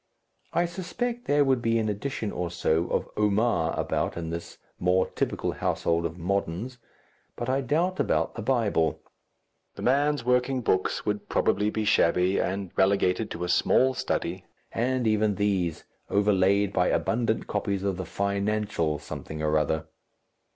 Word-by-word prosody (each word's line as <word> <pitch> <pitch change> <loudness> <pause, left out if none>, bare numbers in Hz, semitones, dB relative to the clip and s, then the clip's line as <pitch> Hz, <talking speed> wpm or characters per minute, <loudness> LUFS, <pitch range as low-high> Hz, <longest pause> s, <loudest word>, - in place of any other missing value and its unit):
I 175 - +2
suspect 235 +8 -4
there 145 0 +4
would 130 -2 +2
be 115 0 +2
an 110 -1 0
edition 105 +1 -3
or 90 -1 -3
so 85 -1 0
of - - -1
"Omar" 105 -5 +1
about - - -1
in 80 -1 -4
this 85 0 -6 0.2
more 90 +1 +3
typical - - -2
household 85 0 0
of 80 +1 -11
"Moderns," 100 +6 -2 0.6
but 120 +1 -4
I 135 +1 +1
doubt 170 +8 0
about - - +1
the 115 - -6
Bible. 105 - +1 0.8
The - - -7
man's 140 0 +2
working 125 +1 +2
books 95 -5 0
would 105 -1 -2
probably 105 +1 +2
be 110 0 -2
shabby 90 0 +3
and 95 -1 -2
relegated 95 +2 +2
to 85 - -5
a - - -1
small 130 +8 +3
study, - - -2 0.3
and 125 +1 0
even 110 -1 +2
these 95 -5 0 0.3
overlaid 100 0 +3
by 90 - +2
abundant 115 -1 0
copies 100 -2 -2
of 100 -2 -1
the 95 - -4
Financial 100 -5 -1
something 75 +1 -7
or 75 0 +1
other. 80 +1 +1
105 Hz, 150 wpm, -27 LUFS, 90-120 Hz, 0.8 s, there